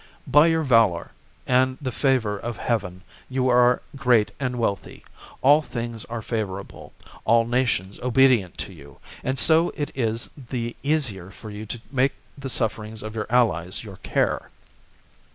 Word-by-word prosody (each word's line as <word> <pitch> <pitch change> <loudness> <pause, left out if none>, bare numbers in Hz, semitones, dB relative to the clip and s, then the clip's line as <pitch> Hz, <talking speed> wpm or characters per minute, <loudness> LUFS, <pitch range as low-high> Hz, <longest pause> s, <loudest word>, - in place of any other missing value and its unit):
By 150 +3 +6
your 160 -1 +2
valour, 115 - +3 0.3
and 130 +1 +2
the 130 -3 -3
favour 125 -5 +1
of 115 +2 -5
heaven, 95 -6 -2 0.3
you 130 -1 +1
are 125 0 +4
great 125 -6 +3
and 125 -2 -2
wealthy. 100 -5 -3 0.4
All 145 +3 +6
things 115 -5 -5
are 115 -1 -6
favourable, 100 -4 -5 0.3
all 115 +1 +4
nations 115 -6 0
obedient 125 -7 +3
to 95 - -12
you, 70 -4 -14 0.3
and 130 +1 -1
so 165 +5 +4
it 145 - -3
is 115 -2 -1
the 120 -3 -5
easier 130 - -1
for 105 +2 -10
you 105 +1 -7
to 120 - -5
make 135 0 +2 0.2
the 140 -1 -6
sufferings 110 -2 -2
of 110 0 -6
your 110 -1 -3
allies 105 -7 +1
your 100 -4 -10
care. - - -1
120 Hz, 150 wpm, -24 LUFS, 105-130 Hz, 0.4 s, By